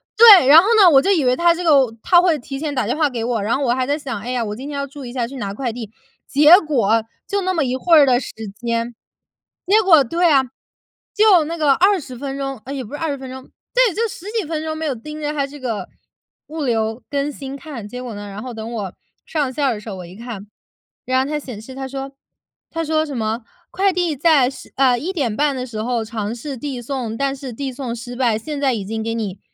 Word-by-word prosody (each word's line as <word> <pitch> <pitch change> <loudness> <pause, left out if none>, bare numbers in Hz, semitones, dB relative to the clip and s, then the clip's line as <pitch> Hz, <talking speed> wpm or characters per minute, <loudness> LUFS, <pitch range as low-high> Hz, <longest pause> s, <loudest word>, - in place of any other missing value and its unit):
对！ 420 - +9
然 305 +4 +10
后 400 - -2
呢， 365 - +8
我 270 -3 +6
就 390 - +1
以 315 -9 +2
为 250 0 +3
它 340 +2 +4
这 355 +1 -5
个 270 -7 +4
它 350 -1 +5
会 335 -5 +2
提 270 +3 -7
前 295 0 -3
打 255 -5 0
电 245 +7 -1
话 305 -3 +2
给 240 -3 -4
我， 235 -4 -1
然 230 +5 +1
后 - - -4
我 240 - +2
还 255 0 0
在 290 +2 0
想： 250 -7 -5
“哎 245 +3 -5
呀， 240 -3 -1
我 210 0 -4
今 270 +5 -7
天 285 - -5
要 280 0 -3
注 280 0 -10
意 240 - -7
下 240 -2 -2
去 275 - -10
拿 200 -5 -4
快 240 0 -3
递。” 225 -3 -7 0.4
结 300 +5 +7
果， 230 -7 +1 0.2
就 400 -1 -1
那 370 0 0
么 325 -4 +1
一 255 +1 -1
会 330 +5 +4
儿 290 - +7
的 250 -2 +3
时 - - -7 0.2
间。 235 0 -3 0.7
结 430 +3 +5
果 325 -7 +6
对 340 +6 +2
啊， 270 -2 +5 0.7
就 415 -6 +5
那 335 +2 -4
个 295 -3 +4
20 345 -8 +1
分 275 +1 -5
钟。 270 -4 -4
呃， 275 - -5
也 265 -2 -4
不 230 - -12
是 295 - -5
20 300 -4 -2
分 265 -1 -9
钟。 260 0 -8 0.3
对， - - +4
就 460 +1 0
10 375 - -10
几 405 - -1
分 315 -1 -3
钟 315 0 -4
没 320 - -4
有 280 - 0
盯 300 +6 -9
着 295 0 -2
它 280 -2 -1
这 290 +1 -11
个， 230 -5 -4 0.6
物 315 -1 -5
流 225 -1 -1
更 285 +1 -1
新 275 -1 -7
看。 270 -8 -8
结 250 +3 -7
果 240 -3 -6
呢， 205 0 -7
然 200 +3 -8
后 255 - -6
等 225 +1 -7
我 200 -5 -4 0.3
上 290 -5 -1
线 285 +2 -1
儿 255 - +2
的 210 - -6
时 215 - -9
候， 195 - -5
我 180 - -8
一 180 +2 -12
看， 225 -3 -8 0.6
然 260 +1 +2
后 - - -4
它 300 -1 -1
显 250 -7 -8
示 260 +4 -11
它 265 0 -5
说 270 0 -6 0.6
它 330 0 -3
说 315 0 +1
什 280 -4 -6
么 220 +1 -2 0.3
“快 390 0 +2
递 345 -4 0
在 285 -3 +4
时 270 - -12
呃， 255 -3 +3
1:30 290 - -1
的 255 0 -4
时 220 -3 -5
候 235 -1 -1
尝 220 0 -4
试 270 +2 -6
递 270 -2 -5
送， 240 -3 -4
但 275 0 -1
是 265 -2 -7
递 265 +2 -5
送 245 -3 -5
失 245 +1 -8
败， 240 -4 +1
现 295 +5 -5
在 265 -3 +2
已 210 -4 -3
经 220 +2 -4
给 225 +1 -2
你， 205 -4 -4
270 Hz, 270 characters per minute, -20 LUFS, 235-305 Hz, 0.7 s, 然